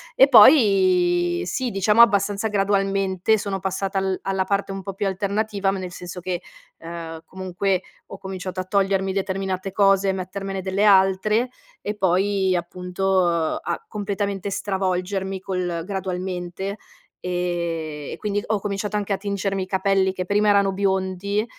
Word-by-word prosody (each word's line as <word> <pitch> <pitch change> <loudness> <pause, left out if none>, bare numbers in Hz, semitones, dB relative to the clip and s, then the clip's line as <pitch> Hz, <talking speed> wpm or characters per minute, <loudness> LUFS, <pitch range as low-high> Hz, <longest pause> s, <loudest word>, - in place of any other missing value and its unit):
E - - +7
poi 180 - +5
sì, 250 +8 -2
diciamo 210 +4 +4
abbastanza 205 -1 +3
gradualmente, 195 0 +1
sono 195 -1 -3
passata 195 +1 -1
al 190 -1 -1
alla 190 -1 0
parte 200 0 -1
un 195 - -5
po' 195 +1 -5
più 200 +1 -1
alternativa, 200 +1 -1
ma 195 - -3
nel 180 -1 -6
senso 180 +1 -7
che, 180 0 -3 0.4
ehm, 165 -1 -7
comunque 185 0 -2 0.3
ho - - -9
cominciato 185 -1 -6
a 185 - -2
togliermi 195 0 +1
determinate 190 -1 -2
cose 195 0 +3
e - - +1
mettermene 190 +1 -4
delle 190 +2 -1
altre, 205 +4 +4 0.3
e 210 - -3
poi 190 0 +1
appunto 180 +2 -1 0.4
a 455 - -4
completamente 200 -1 -2
stravolgermi, 190 0 -2
col 180 -3 -3
gradualmente, 190 0 -4 0.4
e 170 -4 -3
e - - -7
quindi 205 -1 -2
ho 215 -1 0
cominciato 205 +1 -3
anche 205 -1 -1
a 195 - 0
tingermi 195 -1 -2
i - - -5
capelli, 190 0 +1
che 185 -1 -4
prima 205 +2 +2
erano 200 -1 +4
biondi, 190 +1 -1
195 Hz, 145 wpm, -23 LUFS, 185-200 Hz, 0.4 s, E